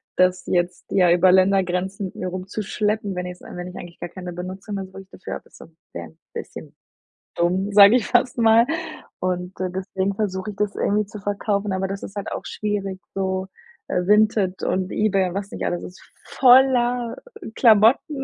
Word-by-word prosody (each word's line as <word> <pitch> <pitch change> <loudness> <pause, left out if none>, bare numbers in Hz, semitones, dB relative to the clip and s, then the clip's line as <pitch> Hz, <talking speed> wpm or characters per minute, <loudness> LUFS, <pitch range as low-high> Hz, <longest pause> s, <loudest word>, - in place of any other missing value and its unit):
das 185 0 +2
jetzt, 175 0 -1
ja, 180 -3 +4
über 180 +1 +5
Ländergrenzen 190 0 +1
mit - - -13
mir 185 - -4
rumzuschleppen, 200 +2 -3
wenn 180 - -3
es 180 0 -8
wenn 180 0 -8
ich 180 - -10
eigentlich 175 -1 -10
gar 175 - -6
keine 180 -1 -8
Benutzung 185 +4 -6
mehr 195 -1 -4
so 185 - -16
richtig 195 0 -12
dafür - - -6
habe - - -10
also, - - -15 0.3
wäre 85 -1 -6
ein 80 - -21 0.2
bisschen - - -8 0.6
dumm, 185 +4 0
sage 200 +3 +8
ich 235 - +1
fast 245 0 +2
mal 225 0 +5 0.5
Und, 180 0 -3
äh, 185 - -1
deswegen 190 +1 -2
versuche 195 -1 -3
ich - - -13
das 210 -1 -1
irgendwie 210 +1 +1
zu 210 +1 -10
verkaufen, 205 0 -2
aber 190 0 -1
das 195 0 -6
ist 195 - -9
halt 200 - -5
auch - - -5
schwierig 200 -3 -3
so. 190 -1 -2 0.4
Äh, 180 +1 -1
Vinted 210 -3 +2
und 185 0 -1
eBay 195 -3 +1
und 180 - -8
was 200 0 -4
nicht - - -6
alles, 175 - -2
ist 180 - -11 0.2
voller 245 -2 +4 0.4
Klamotten, 235 +5 +4
195 Hz, 190 wpm, -22 LUFS, 185-210 Hz, 0.6 s, sage